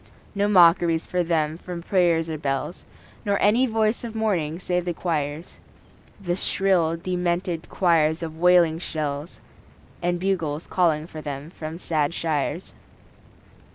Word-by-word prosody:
No 200 Hz, 0 st, +1 dB
mockeries 170 Hz, -4 st, +5 dB
for 180 Hz, -, -1 dB
them 160 Hz, -2 st, 0 dB
from 175 Hz, -2 st, -7 dB
prayers 170 Hz, -3 st, +2 dB
or 160 Hz, -2 st, -4 dB
bells, 135 Hz, +4 st, -3 dB, 0.4 s
Nor 200 Hz, -1 st, 0 dB
any 230 Hz, +6 st, +4 dB
voice 220 Hz, 0 st, 0 dB
of 230 Hz, -2 st, -6 dB
mourning 180 Hz, -8 st, 0 dB
save 180 Hz, 0 st, -1 dB
the 175 Hz, -1 st, -3 dB
choirs 155 Hz, -1 st, -3 dB, 0.6 s
The 175 Hz, -3 st, -2 dB
shrill, 180 Hz, -4 st, +1 dB
demented 175 Hz, -1 st, -2 dB
choirs 165 Hz, -2 st, +2 dB
of 160 Hz, -1 st, -6 dB
wailing 175 Hz, -2 st, +4 dB
shells; 150 Hz, -1 st, -4 dB, 0.6 s
And 175 Hz, 0 st, 0 dB
bugles 170 Hz, -5 st, -1 dB
calling 160 Hz, -4 st, +1 dB
for 160 Hz, -2 st, -9 dB
them 145 Hz, +1 st, -6 dB
from 160 Hz, -2 st, -7 dB
sad 160 Hz, -2 st, -1 dB
shires. 160 Hz, +2 st, -2 dB
170 Hz, 135 wpm, -24 LUFS, 155-180 Hz, 0.6 s, mockeries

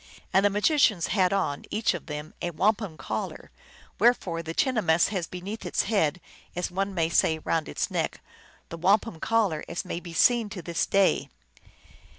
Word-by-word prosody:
And 190 Hz, -, +4 dB
the 205 Hz, -, +5 dB
magicians 210 Hz, -, +3 dB
had 185 Hz, -3 st, +3 dB
on, 185 Hz, -8 st, -1 dB
each 215 Hz, -2 st, +1 dB
of 175 Hz, -, -7 dB
them, 150 Hz, 0 st, -6 dB
a 175 Hz, -, -1 dB
wampum 195 Hz, +1 st, 0 dB
collar; 110 Hz, -6 st, -5 dB, 0.5 s
wherefore 200 Hz, -7 st, +2 dB
the 165 Hz, 0 st, -6 dB
chinahmess 210 Hz, -, +2 dB
has 185 Hz, -5 st, -2 dB
beneath 195 Hz, +5 st, -7 dB
its -, -, 0 dB
head, 180 Hz, -7 st, +1 dB, 0.4 s
as 180 Hz, 0 st, -2 dB
one 195 Hz, +1 st, -2 dB
may 165 Hz, -2 st, +2 dB
say, 160 Hz, -1 st, +2 dB
round 160 Hz, 0 st, -1 dB
its -, -, -2 dB
neck, -, -, -2 dB, 0.5 s
the 170 Hz, -, -6 dB
wampum 195 Hz, +1 st, +2 dB
collar, 205 Hz, -9 st, +1 dB
as 170 Hz, +2 st, -4 dB
may 175 Hz, -, -4 dB
be 175 Hz, -1 st, -10 dB
seen 230 Hz, +6 st, +3 dB
to 195 Hz, -4 st, -7 dB
this 170 Hz, 0 st, -1 dB
day. 195 Hz, -1 st, +2 dB
180 Hz, 170 wpm, -27 LUFS, 165-210 Hz, 0.5 s, the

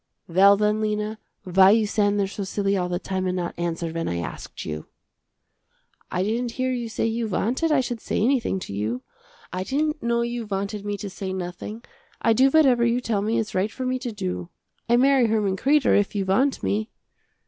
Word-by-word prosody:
"Well 195 Hz, +4 st, +6 dB
then 210 Hz, +1 st, +1 dB
Lena, 215 Hz, 0 st, -2 dB, 0.2 s
why 190 Hz, 0 st, +5 dB
you 220 Hz, +1 st, +4 dB
stand 205 Hz, -1 st, +1 dB
there 200 Hz, -, +2 dB
so 195 Hz, +1 st, -5 dB
silly 200 Hz, +1 st, 0 dB
all 180 Hz, -2 st, -1 dB
the 175 Hz, -, -1 dB
time 185 Hz, 0 st, -3 dB
and 180 Hz, -, -1 dB
not 175 Hz, -1 st, -2 dB
answer 170 Hz, -1 st, -2 dB
when 165 Hz, 0 st, -3 dB
I 85 Hz, -, -2 dB
asked 85 Hz, -, -6 dB
you." 75 Hz, 0 st, -5 dB, 1.2 s
"I 180 Hz, -, 0 dB
didn't 230 Hz, +3 st, -1 dB
hear 255 Hz, +1 st, -1 dB
you 240 Hz, -2 st, -3 dB
say 220 Hz, -, -1 dB
you 225 Hz, 0 st, -1 dB
wanted 245 Hz, -, 0 dB
I 290 Hz, -3 st, +4 dB
should 240 Hz, -3 st, -4 dB
say -, -, -2 dB
anything 240 Hz, -3 st, +1 dB
to 100 Hz, -, -6 dB
you. 110 Hz, +5 st, -2 dB, 0.5 s
I 185 Hz, 0 st, -2 dB
didn't 300 Hz, +7 st, -1 dB
know 235 Hz, 0 st, +1 dB
you 235 Hz, -1 st, -3 dB
wanted 200 Hz, +1 st, -3 dB
me 205 Hz, 0 st, -2 dB
to 200 Hz, 0 st, -6 dB
say 190 Hz, 0 st, -5 dB
nothing. 190 Hz, +5 st, -6 dB, 0.4 s
I 225 Hz, -, +3 dB
do 260 Hz, +4 st, +5 dB
whatever 265 Hz, -5 st, +4 dB
you 235 Hz, +1 st, +2 dB
tell 225 Hz, -5 st, -1 dB
me 220 Hz, +3 st, 0 dB
it's 220 Hz, -1 st, -2 dB
right 195 Hz, +3 st, 0 dB
for 255 Hz, -, -5 dB
me 255 Hz, 0 st, 0 dB
to 250 Hz, -2 st, -4 dB
do. 185 Hz, -4 st, -4 dB, 0.4 s
I 240 Hz, -, +5 dB
marry 265 Hz, -1 st, +4 dB
Herman 210 Hz, -3 st, +1 dB
Kreder, 280 Hz, +7 st, +3 dB
if 205 Hz, +1 st, +1 dB
you 195 Hz, -1 st, 0 dB
want 255 Hz, +9 st, +1 dB
me." 215 Hz, +2 st, -1 dB
210 Hz, 210 wpm, -24 LUFS, 190-235 Hz, 1.2 s, Well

